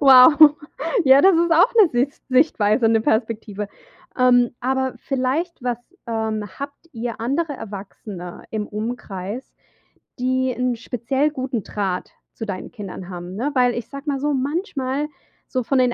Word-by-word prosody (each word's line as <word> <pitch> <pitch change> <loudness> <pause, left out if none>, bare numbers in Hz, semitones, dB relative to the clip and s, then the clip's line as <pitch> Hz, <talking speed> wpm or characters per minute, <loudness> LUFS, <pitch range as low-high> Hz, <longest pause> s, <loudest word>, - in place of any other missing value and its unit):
Wow. 285 +3 +8 0.5
Ja, 265 0 +7
das 385 +1 +6
ist 340 0 +3
auch 355 +10 +5
'ne 430 -6 +7
Sis 250 +3 -1
Sichtweise, 245 -4 +3
'ne 225 0 +3
Perspektive. 220 -2 -1 0.5
Ähm, 245 -1 +5
aber 265 +1 0
vielleicht, 270 +4 -2
was 245 -2 -1 0.3
ähm, 220 -2 -2 0.2
habt 285 +4 -8
ihr 230 -2 -5
andere 285 +7 -1
Erwachsene 195 -4 -8
im 215 -1 -3
Umkreis, 215 0 -5 0.7
die 260 +1 +1
'n 250 0 0
speziell 250 +4 -1
guten 260 -6 -3
Draht 190 -3 -3 0.2
zu 225 - -6
deinen 190 -3 -5
Kindern 190 -2 -8
haben, 175 +1 -7
ne? 265 +7 -1
Weil 250 -1 +4
ich 240 - -4
sage 275 +1 -9
mal 280 -2 0
so, 295 +2 0
manchmal 280 -1 -1 0.4
so 255 -1 -1
von 270 +3 +1
den 250 -1 +3
250 Hz, 150 wpm, -22 LUFS, 220-275 Hz, 0.7 s, Wow